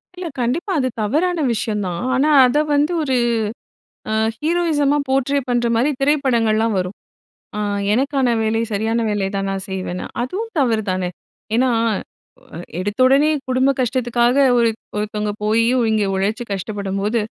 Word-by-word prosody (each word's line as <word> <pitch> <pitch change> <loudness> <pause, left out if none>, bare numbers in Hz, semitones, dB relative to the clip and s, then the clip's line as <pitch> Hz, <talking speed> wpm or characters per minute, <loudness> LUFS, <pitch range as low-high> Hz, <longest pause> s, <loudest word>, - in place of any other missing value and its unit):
இல்ல, 360 -1 -5
கண்டிப்பா 270 - -1
அது 255 - +1
தவறான 320 - 0
விஷயம் 210 -2 -2
தான். 170 -1 -4
ஆனா 280 +4 +2 0.2
அதை 270 +5 +2
வந்து 295 +4 +2
ஒரு 265 -3 0 1.0
அ - - 0 0.2
ஹீரோயிசமா 305 -3 +1
போர்ட்ரே 270 +1 +1
பண்ணுற 240 -1 +1
மாரி 245 +6 +2
திரைப்படங்கள்லாம் 235 -6 +2
வரும். 180 +2 -4 0.6
அ - - -3 0.3
எனக்கான 270 +2 +1
வேலை, 220 +1 0
சரியான 220 +3 0
வேலை 205 -2 0
தான் 195 0 -2
நான் 195 0 -4
செய்வேன்னு. 185 -1 -4 0.2
அதுவும் 410 - -4
தவறு 230 -6 +2
தானே, 185 -1 -1 0.5
ஏன்னா? 255 +1 +3 1.1
எடுத்தவுடனே 255 +9 +3 0.2
குடும்ப 260 +1 +3
கஷ்டத்துக்காக 245 -1 +1 0.2
ஒரு 235 -1 +3 0.3
ஒருத்தவங்க 210 0 -2
போய் 220 +2 +3 0.3
இங்கே 215 -2 +1
உழைச்சு 205 +5 -1
கஷ்டப்படும்போது, 200 +2 -2
235 Hz, 130 wpm, -20 LUFS, 210-275 Hz, 1.1 s, ஏன்னா